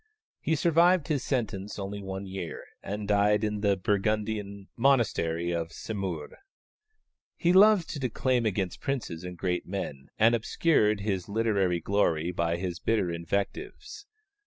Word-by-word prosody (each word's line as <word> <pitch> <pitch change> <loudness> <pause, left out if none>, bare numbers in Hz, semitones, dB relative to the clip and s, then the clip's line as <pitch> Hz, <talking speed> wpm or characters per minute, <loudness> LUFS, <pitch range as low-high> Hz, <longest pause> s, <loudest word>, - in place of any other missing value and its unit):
He 160 - 0
survived 170 +1 +3
his 145 -4 0
sentence 105 -6 -2
only 100 0 -5
one 95 0 -5
year, 95 -3 -6 0.2
and 105 0 -5
died 105 +1 +3
in 105 -1 -1
the 100 -2 +2
Burgundian 105 0 -1
monastery 95 -10 +2
of 85 -1 -2
Semur. 95 -8 -5 1.0
He 175 +1 +2
loved 200 -2 +6
to 145 - -5
declaim 125 -1 0
against 95 -3 -2
princes 120 -12 -3
and 90 -1 -7
great 90 -1 -2
men, 75 -8 -5
and 115 +2 +5
obscured 110 -3 +2
his 100 -2 -2
literary 100 -5 +1
glory 85 -4 +1
by 85 -1 0
his 90 -1 -4
bitter 100 -3 0
invectives. 100 - -4
100 Hz, 135 wpm, -28 LUFS, 90-115 Hz, 1.0 s, loved